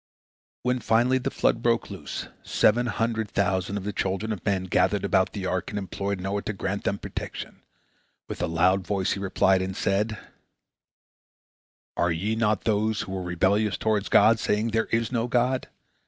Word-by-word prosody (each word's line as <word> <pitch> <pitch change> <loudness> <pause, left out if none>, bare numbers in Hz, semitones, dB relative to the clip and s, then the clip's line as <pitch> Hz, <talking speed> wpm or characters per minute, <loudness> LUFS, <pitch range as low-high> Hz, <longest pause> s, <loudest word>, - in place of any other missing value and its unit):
When 125 +1 +1
finally 120 +3 +3
the - - -2
flood - - +1
broke 115 -2 +1
loose, 90 -7 -6
seven 120 +3 +2
hundred 110 -1 -1
thousand 100 0 0
of 100 - -5
the 105 +1 -3
children 95 +4 -1
of 95 - -8
men 95 -2 0
gathered 100 +2 +1
around 95 -1 +3
the 100 -3 -5
ark, 95 0 -1
and 105 - -4
implored 100 0 -3
Noah 100 +2 -2
to 110 - -4
grant 100 +1 -3
them 100 - 0
protection. - - -7 0.7
With - - -6
a - - +1
loud 90 +3 +2
voice 95 -3 0
he - - -1
replied, 95 -1 +2
and 95 +1 -4
said: 105 +2 0 1.8
"Are 85 0 +1
ye 100 +7 -1
not 110 -2 +1
those 110 0 +1
who 95 - -6
were 95 -1 -3
rebellious 95 +4 +1
toward 105 -2 0
God, 110 +1 +5
saying, 105 +2 0
'There 110 0 +1
is 115 -1 -1
no 120 -1 0
God'? 125 +1 +1
100 Hz, 175 wpm, -26 LUFS, 95-110 Hz, 1.8 s, God